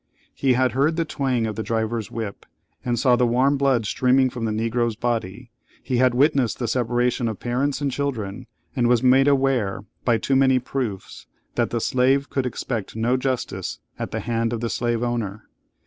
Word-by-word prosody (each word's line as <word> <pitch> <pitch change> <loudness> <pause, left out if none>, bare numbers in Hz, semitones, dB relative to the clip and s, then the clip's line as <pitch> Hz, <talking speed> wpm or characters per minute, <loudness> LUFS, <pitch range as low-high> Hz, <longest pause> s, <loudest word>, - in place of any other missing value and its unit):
He 135 -2 +2
had 130 0 +2
heard 140 +6 +1
the 165 0 0
twang 130 -6 -1
of 110 -1 -3
the 110 - -3
driver's 110 -1 -2
whip, 110 -3 -6 0.4
and 120 -1 -1
saw 125 +1 +4
the 125 0 +2
warm 130 +4 +3
blood 135 -5 +2
streaming 130 +3 +2
from 120 -2 -4
the 110 - -1
Negro's 115 +1 0
body; 115 0 -3 0.3
he 125 - -1
had 125 0 +3
witnessed 135 -3 +2
the 120 - -2
separation 120 +1 0
of 110 -4 -4
parents 135 +4 -1
and 140 -1 0
children, 125 -5 -3 0.3
and 120 -3 +2
was 120 0 +3
made 130 +2 +5
aware, 130 -8 +1 0.2
by 120 -2 +3
too 135 +5 0
many 130 -1 +4
proofs, 125 -6 -4 0.3
that - - 0
the 120 - -1
slave 130 +4 +1
could 135 -2 0
expect 115 -4 -4
no 115 +3 +1
justice 130 -1 -2 0.2
at - - -3
the - - -3
hand 115 0 -1
of 115 - -2
the 115 0 -2
slave 120 -1 -1
owner. 110 -4 -3
120 Hz, 190 wpm, -23 LUFS, 115-130 Hz, 0.4 s, made